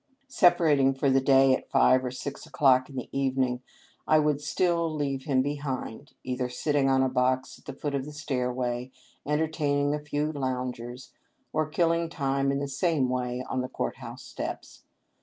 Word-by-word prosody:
Separating 160 Hz, -, +4 dB
for 135 Hz, 0 st, +1 dB
the 135 Hz, 0 st, +4 dB
day 135 Hz, 0 st, +5 dB
at -, -, -8 dB
five 130 Hz, 0 st, +4 dB
or 125 Hz, -, -2 dB
six 130 Hz, +3 st, -7 dB
o'clock 135 Hz, -6 st, +3 dB
in 135 Hz, -, -11 dB
the 130 Hz, -, -4 dB
evening, 130 Hz, -2 st, 0 dB, 0.5 s
I 155 Hz, -, +5 dB
would 150 Hz, -1 st, +2 dB
still 170 Hz, +2 st, +1 dB
leave 140 Hz, -3 st, -2 dB
him 130 Hz, -2 st, +2 dB
behind, 140 Hz, -5 st, -4 dB
either 125 Hz, -1 st, -2 dB
sit 125 Hz, +5 st, -2 dB
ting 140 Hz, -2 st, +3 dB
on 130 Hz, 0 st, +3 dB
a -, -, +3 dB
box 130 Hz, 0 st, 0 dB
at -, -, -26 dB
the -, -, -6 dB
foot 145 Hz, +2 st, -4 dB
of 135 Hz, -1 st, -1 dB
the 150 Hz, -, -8 dB
stairway, 125 Hz, -4 st, -2 dB, 0.4 s
enter 150 Hz, +2 st, +1 dB
taining 145 Hz, -2 st, 0 dB
a 150 Hz, 0 st, -3 dB
few 150 Hz, +1 st, -1 dB
loungers, 125 Hz, -3 st, -4 dB, 0.4 s
or 155 Hz, -1 st, 0 dB
killing 165 Hz, +1 st, +1 dB
time 140 Hz, -3 st, 0 dB
in 140 Hz, -, 0 dB
the 140 Hz, 0 st, -2 dB
same 140 Hz, -1 st, +1 dB
way 125 Hz, 0 st, -2 dB
on 130 Hz, -, -1 dB
the 130 Hz, -, -4 dB
court -, -, -3 dB
house -, -, -9 dB
steps. -, -, -7 dB
135 Hz, 185 wpm, -27 LUFS, 130-150 Hz, 0.5 s, day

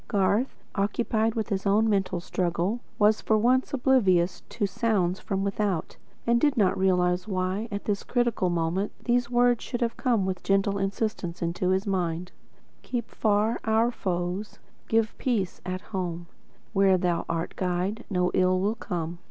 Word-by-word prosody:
Garth, 205 Hz, +5 st, +1 dB, 0.2 s
occupied 220 Hz, +2 st, 0 dB
with 220 Hz, -1 st, -2 dB
his 200 Hz, -1 st, -1 dB
own 210 Hz, +3 st, +4 dB
mental 195 Hz, -4 st, +1 dB
struggle, 180 Hz, +5 st, -1 dB, 0.2 s
was, 210 Hz, +1 st, +4 dB
for 220 Hz, -, +2 dB
once, 250 Hz, +4 st, +2 dB
oblivious 205 Hz, -10 st, +2 dB
to 215 Hz, -, -1 dB
sounds 195 Hz, -3 st, 0 dB
from 195 Hz, -1 st, -2 dB
without, 200 Hz, -3 st, -1 dB, 0.3 s
and 235 Hz, 0 st, +3 dB
did 290 Hz, -3 st, +3 dB
not 195 Hz, -4 st, +3 dB
realise 180 Hz, -1 st, +2 dB
why, 190 Hz, +2 st, -1 dB
at 205 Hz, 0 st, -4 dB
this 205 Hz, -2 st, 0 dB
critical 240 Hz, -7 st, 0 dB
moment, 175 Hz, +4 st, 0 dB
these 245 Hz, -1 st, +1 dB
words 245 Hz, -1 st, +3 dB
should 245 Hz, -, -4 dB
have 235 Hz, -1 st, -1 dB
come 235 Hz, -7 st, +1 dB
with 185 Hz, -1 st, -3 dB
gentle 195 Hz, 0 st, +1 dB
insistence 195 Hz, -3 st, -2 dB
into 170 Hz, +2 st, -1 dB
his 190 Hz, +2 st, +1 dB
mind: 180 Hz, -3 st, -1 dB, 0.5 s
"Keep 245 Hz, -2 st, -4 dB
far 215 Hz, +1 st, +1 dB
our 225 Hz, +2 st, +2 dB
foes; 180 Hz, -1 st, -3 dB, 0.3 s
give 225 Hz, -1 st, +1 dB
peace 215 Hz, -9 st, -1 dB
at 185 Hz, 0 st, -3 dB
home; 175 Hz, -5 st, -4 dB, 0.5 s
Where 195 Hz, -2 st, +4 dB
Thou 175 Hz, -2 st, 0 dB
art 165 Hz, 0 st, -2 dB
Guide, 185 Hz, +5 st, -1 dB
no 180 Hz, -3 st, +1 dB
ill 185 Hz, 0 st, +3 dB
can 225 Hz, -, -13 dB
come." 170 Hz, 0 st, -3 dB
195 Hz, 160 wpm, -27 LUFS, 180-225 Hz, 0.5 s, own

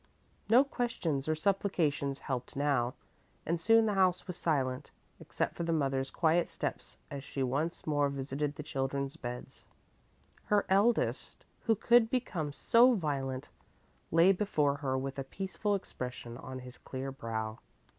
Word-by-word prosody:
No 245 Hz, +5 st, +7 dB
questions 230 Hz, -, -2 dB
or 155 Hz, -, +2 dB
supplications 155 Hz, -6 st, 0 dB
helped 125 Hz, -2 st, -3 dB
now, 135 Hz, -3 st, +1 dB, 0.5 s
and 165 Hz, +1 st, -1 dB
soon 225 Hz, +4 st, +5 dB
the 210 Hz, -, +1 dB
house 185 Hz, -2 st, +2 dB
was 180 Hz, -, -5 dB
silent, 135 Hz, -7 st, -1 dB, 0.3 s
except -, -, -2 dB
for -, -, -6 dB
the 170 Hz, 0 st, 0 dB
mother's 135 Hz, -4 st, 0 dB
quiet 170 Hz, +1 st, +2 dB
steps -, -, -5 dB
as 140 Hz, -1 st, -5 dB
she 135 Hz, -1 st, -3 dB
once 145 Hz, +7 st, -1 dB
more 145 Hz, -2 st, +2 dB
visited 140 Hz, +1 st, -3 dB
the 150 Hz, -, -6 dB
children's 140 Hz, -1 st, -2 dB
beds. 125 Hz, 0 st, -8 dB, 0.8 s
Her 205 Hz, -1 st, +2 dB
eldest, 205 Hz, +5 st, +1 dB, 0.2 s
who 225 Hz, -, +4 dB
could 235 Hz, +2 st, +5 dB
become 180 Hz, -, -1 dB
so 240 Hz, -, +5 dB
violent, 140 Hz, -6 st, -2 dB, 0.6 s
lay 165 Hz, +4 st, +6 dB
before 155 Hz, -8 st, +1 dB
her 135 Hz, -2 st, -1 dB
with 135 Hz, +1 st, -4 dB
a -, -, -1 dB
peaceful 195 Hz, +7 st, -2 dB
expression 125 Hz, -9 st, -6 dB
on 130 Hz, 0 st, -7 dB
his 125 Hz, 0 st, -11 dB
clear 135 Hz, +1 st, -5 dB
brow. 110 Hz, -4 st, -4 dB
145 Hz, 145 wpm, -32 LUFS, 135-190 Hz, 0.8 s, No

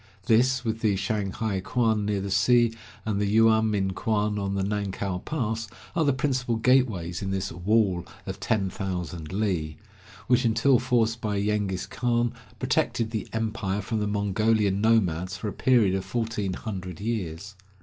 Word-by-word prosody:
This, 125 Hz, +3 st, +3 dB
with 110 Hz, 0 st, -1 dB
the 110 Hz, -3 st, +2 dB
Shanghai 100 Hz, 0 st, -1 dB
kuan 110 Hz, -1 st, +1 dB
near 100 Hz, -2 st, 0 dB
the 100 Hz, 0 st, -4 dB
sea, 115 Hz, +4 st, +4 dB, 0.3 s
and 105 Hz, -2 st, 0 dB
the 100 Hz, -, +1 dB
Yuamin 110 Hz, -4 st, +3 dB
kuan, 105 Hz, 0 st, 0 dB
on 100 Hz, 0 st, -2 dB
the 95 Hz, -, 0 dB
Nankow 100 Hz, -2 st, -2 dB
pass, 115 Hz, -7 st, -2 dB, 0.3 s
are 165 Hz, -, +3 dB
the 145 Hz, -, +3 dB
principal 130 Hz, -3 st, 0 dB
gateways 110 Hz, -8 st, +2 dB
in 95 Hz, -, -3 dB
this 95 Hz, 0 st, -2 dB
"wall 95 Hz, -1 st, +1 dB, 0.2 s
of -, -, -5 dB
ten 100 Hz, -4 st, 0 dB
thousand 90 Hz, -5 st, -4 dB
li," 90 Hz, -7 st, -1 dB, 0.5 s
which, 125 Hz, +1 st, +3 dB
until 115 Hz, +3 st, +4 dB
forced 120 Hz, -2 st, +1 dB
by 105 Hz, -2 st, -1 dB
Yengiz 100 Hz, -2 st, -1 dB
Khan, 120 Hz, -1 st, 0 dB, 0.2 s
protected 115 Hz, -1 st, 0 dB
the 110 Hz, -2 st, -3 dB
empire 110 Hz, -3 st, -2 dB
from 110 Hz, +2 st, -2 dB
the 105 Hz, -, -1 dB
Mongolian 105 Hz, 0 st, +1 dB
nomads 95 Hz, -4 st, +2 dB
for 105 Hz, -, -4 dB
a -, -, -6 dB
period 115 Hz, -7 st, +3 dB
of 95 Hz, -1 st, -1 dB
fourteen 110 Hz, -5 st, -2 dB
hundred 95 Hz, -5 st, -6 dB
years. 100 Hz, -3 st, -4 dB
105 Hz, 160 wpm, -26 LUFS, 95-115 Hz, 0.5 s, sea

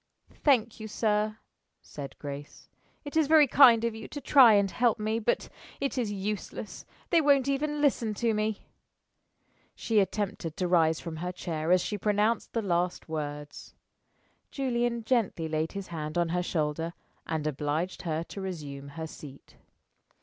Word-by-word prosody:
"Thank 235 Hz, -7 st, +3 dB
you, 215 Hz, -, -6 dB
sir," 215 Hz, 0 st, 0 dB, 0.5 s
said 140 Hz, -2 st, -9 dB
Grace. 145 Hz, 0 st, -8 dB, 0.4 s
"It 290 Hz, -, -7 dB
is 315 Hz, -2 st, +3 dB
very 310 Hz, -1 st, +7 dB
kind 245 Hz, -4 st, +7 dB
of 230 Hz, -, 0 dB
you 220 Hz, -, -8 dB
to 290 Hz, -, -7 dB
try 260 Hz, -4 st, +7 dB
and 200 Hz, -2 st, +3 dB
help 240 Hz, -2 st, +2 dB
me, 215 Hz, +1 st, -1 dB
but 230 Hz, +1 st, 0 dB, 0.3 s
it 275 Hz, -3 st, -2 dB
is 235 Hz, -5 st, -1 dB
useless. 205 Hz, +1 st, -5 dB, 0.2 s
They 335 Hz, -2 st, +5 dB
won't 280 Hz, -3 st, +4 dB
even 295 Hz, +2 st, -1 dB
listen 235 Hz, -7 st, +1 dB
to 230 Hz, +1 st, +1 dB
me." 215 Hz, 0 st, -2 dB, 1.1 s
She 225 Hz, -2 st, +1 dB
attempted 190 Hz, -4 st, -2 dB
to 180 Hz, -, 0 dB
rise 165 Hz, -2 st, +3 dB
from 165 Hz, -2 st, -6 dB
her 180 Hz, +3 st, -3 dB
chair 165 Hz, -2 st, -3 dB
as 180 Hz, 0 st, +5 dB
she 210 Hz, +3 st, -3 dB
pronounced 210 Hz, +3 st, +1 dB
the 230 Hz, -, -1 dB
last 175 Hz, -2 st, -1 dB
words. 145 Hz, -2 st, -6 dB, 0.7 s
Julian 240 Hz, -3 st, -1 dB
gently 220 Hz, -9 st, 0 dB
laid 155 Hz, 0 st, -2 dB
his 200 Hz, -1 st, -5 dB
hand 155 Hz, -1 st, -4 dB
on 170 Hz, -1 st, +1 dB
her 180 Hz, +1 st, 0 dB
shoulder 165 Hz, -1 st, -2 dB, 0.3 s
and 160 Hz, -2 st, -2 dB
obliged 155 Hz, +4 st, -2 dB
her 160 Hz, -1 st, -2 dB
to 195 Hz, -, -8 dB
resume 145 Hz, -7 st, -6 dB
her 160 Hz, -, -3 dB
seat. 145 Hz, -3 st, -12 dB
200 Hz, 160 wpm, -28 LUFS, 160-235 Hz, 1.1 s, very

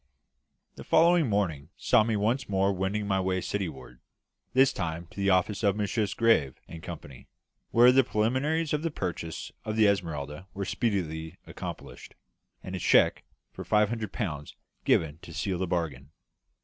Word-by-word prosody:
The -, -, -8 dB
following 165 Hz, -3 st, +4 dB
morning 85 Hz, -8 st, -1 dB
saw 110 Hz, -, +4 dB
me 110 Hz, 0 st, 0 dB
once 115 Hz, +5 st, 0 dB
more 95 Hz, 0 st, +2 dB
wending 95 Hz, +3 st, -2 dB
my 95 Hz, -1 st, +1 dB
way 95 Hz, 0 st, 0 dB
Cityward, 75 Hz, -12 st, -5 dB, 0.6 s
this 135 Hz, +1 st, +5 dB
time 85 Hz, 0 st, -3 dB
to -, -, -18 dB
the 100 Hz, 0 st, +2 dB
office 95 Hz, +2 st, +2 dB
of 100 Hz, -3 st, +2 dB
Messrs. 105 Hz, 0 st, -1 dB
Musgrave 110 Hz, -, +2 dB
and 85 Hz, -, -9 dB
Company, 75 Hz, -5 st, -9 dB, 0.4 s
where 120 Hz, +2 st, +7 dB
the 135 Hz, +1 st, +5 dB
preliminaries 130 Hz, +9 st, 0 dB
of 150 Hz, -, 0 dB
the 165 Hz, -, -1 dB
purchase 85 Hz, -, -5 dB
of 110 Hz, -, -3 dB
the 110 Hz, -1 st, +5 dB
Esmeralda 85 Hz, -3 st, -2 dB
were 100 Hz, 0 st, -3 dB
speedily 80 Hz, -10 st, -2 dB
accomplished, -, -, -8 dB, 0.5 s
and 95 Hz, -, -5 dB
a -, -, -4 dB
cheque -, -, +4 dB, 0.3 s
for -, -, -7 dB
five 105 Hz, -1 st, +3 dB
hundred 110 Hz, -4 st, -4 dB
pounds 75 Hz, -, -4 dB, 0.3 s
given 80 Hz, -1 st, +2 dB
to 85 Hz, -, -11 dB
seal 90 Hz, +3 st, -2 dB
the 95 Hz, -, -1 dB
bargain. 75 Hz, -6 st, -3 dB
95 Hz, 160 wpm, -28 LUFS, 80-110 Hz, 0.6 s, where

